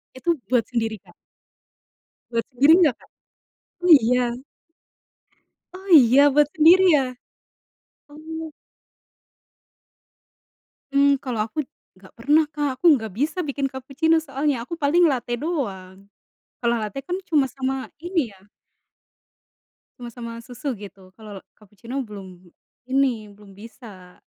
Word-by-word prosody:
Itu 330 +5 -1
buat 245 -2 +1
sendiri 225 -3 -3
Kak? - - -21 1.2
Buat 230 0 -1
sendiri 280 +6 +5
nggak 295 -7 +3
Kak? - - -22 0.7
Oh 360 - +4
iya? 250 +2 +2 1.6
Oh 385 +1 -14
iya 255 +4 +5
buat 295 0 +4
sendiri 345 +5 +6
ya? 270 -2 +2 1.1
Oh. 320 +1 -8 2.4
Mmm, 280 0 +4
kalau 245 -4 -4
aku, 300 +7 -4 0.3
nggak 190 0 -18
pernah 295 +7 +3
Kak 290 -4 -3
aku - - -5
nggak 220 -3 -7
bisa 290 - -2
bikin 275 -1 -2
kapucino 275 +5 0
soalnya, 275 -4 -2
aku 335 - -8
paling 335 +3 +3
late 245 -4 -2
doang. 200 - -5 0.5
Kalau 235 -1 +1
late 215 +6 -5
kan 360 - -3
cuma 295 -5 +3
sama 265 +1 -4 0.2
ini 335 - -2
ya - - -22 1.6
cuma 240 -1 -7
sama 230 -1 -8
susu 255 +3 -6
gitu 195 -3 -13
kalau 210 -1 -11 0.2
cappuccino 230 +6 -8
belum, 190 -5 -11 0.4
ini 255 -6 0
belum 200 -1 -17
bisa. 200 -3 -14
255 Hz, 120 wpm, -22 LUFS, 220-295 Hz, 2.4 s, sendiri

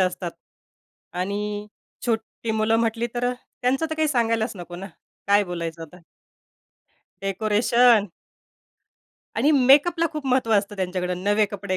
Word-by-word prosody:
असतात 180 -1 0 0.9
आणि 205 +2 -3 0.4
छोटी 225 0 -2
मुलं 220 +1 +2
म्हटली 230 +1 0
तर 245 0 -1
अ, - - -2 0.3
त्यांचं 265 +6 +1
तर - - -1
काही 315 -1 +1
सांगायलाच 230 -3 +1
नको 175 0 -8
ना, 195 - -7 0.4
काय 205 0 +4
बोलायचं 170 -2 -5
आता. 165 +3 -12 1.2
डेकोरेशन. 215 +2 +3 1.3
आणि 295 - +3
मेकअपला 295 +5 +5
खूप 300 -3 -5
महत्व 250 -3 +2
असतं 205 0 +1
त्यांच्याकडं. 180 -1 -2
नवे 205 +1 +3
कपडे 200 -2 -4
215 Hz, 130 wpm, -24 LUFS, 190-245 Hz, 1.3 s, मेकअपला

